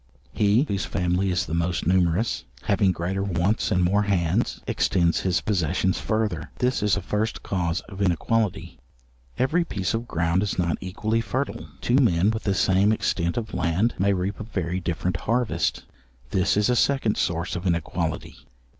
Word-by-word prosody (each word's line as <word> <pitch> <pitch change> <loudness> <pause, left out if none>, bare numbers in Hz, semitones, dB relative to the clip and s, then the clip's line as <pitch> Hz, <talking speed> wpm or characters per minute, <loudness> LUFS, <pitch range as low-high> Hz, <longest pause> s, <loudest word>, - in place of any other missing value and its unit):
He, 105 +5 +3
whose 100 -10 -2
family 90 +2 0
is 90 -1 0
the - - -6
most 85 +1 -1
numerous, 90 +4 +1 0.2
having 100 -1 +2
greater 90 +2 -2
wants 95 +2 0
and 90 -2 +3
more 100 +4 +3
hands, 95 -5 0
extends 85 -2 +1
his 95 0 0
possessions 95 -1 0
further; 105 -8 -1
this 125 +1 0
is 105 -2 +2
a - - -3
first 110 +2 -2
cause 90 -2 -1
of 95 +1 -9
inequality.—Every 90 - -2
piece 95 - -2
of 115 +1 -2
ground 85 +1 +1
is 100 -1 -2
not 85 -2 0
equally 110 +5 -1
fertile; 130 +6 -3
two 120 - +2
men 100 -6 +3
with 110 0 -4
the 100 -2 +1
same 95 +3 +3
extent 85 -4 0
of 110 -2 -4
land, 90 +8 +1
may 100 +1 +3
reap 95 +1 -2
a - - -4
very 90 -4 -3
different 85 0 -2
harvest; 115 +4 -1 0.5
this 95 +1 +2
is 105 - +3
a 125 - +2
second 130 -4 +2
source 85 +2 -1
of 90 +2 -3
inequality. 85 -2 -2
95 Hz, 165 wpm, -25 LUFS, 85-110 Hz, 0.5 s, He